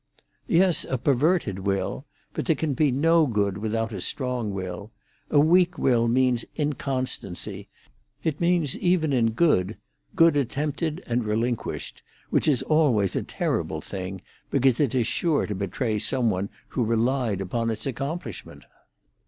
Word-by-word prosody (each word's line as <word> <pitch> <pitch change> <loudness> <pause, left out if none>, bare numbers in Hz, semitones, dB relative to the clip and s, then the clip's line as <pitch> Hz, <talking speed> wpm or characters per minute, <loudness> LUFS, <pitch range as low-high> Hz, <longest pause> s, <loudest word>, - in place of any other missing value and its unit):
"Yes, 180 0 +4
a 130 - -1
perverted 135 - +1
will. 95 -1 -2 0.3
But - - -3
there - - +4
can 155 -3 -1
be 145 +1 +2
no 160 +4 +4
good 100 -4 0
without 110 +1 -2
a 95 - -4
strong 125 -1 -1
will. 95 +2 -6 0.4
A 145 - +4
weak 175 +3 +4
will 120 -3 +2
means 125 0 +2
inconstancy. 135 - -3 0.5
It 155 -1 -2
means, 170 -5 +2
even 175 -5 +2
in 115 -3 +2
good, 110 - +2 0.4
good 165 -4 +5
attempted 150 +5 -2
and 120 0 0
relinquished, 115 +2 -2 0.3
which - - +2
is 140 -5 +2
always 130 - +2
a - - +1
terrible - - -2
thing, 95 -1 -6 0.3
because 130 -2 +2
it 140 -5 +1
is 120 -3 +2
sure 160 +4 +1
to 105 - -3
betray 105 +3 -2
some 120 +1 0
one 95 +1 -2 0.2
who 125 - -1
relied 115 -1 +1
upon 115 +5 -2
its 110 - -4
accomplishment." 140 +7 -5
125 Hz, 145 wpm, -25 LUFS, 110-150 Hz, 0.5 s, good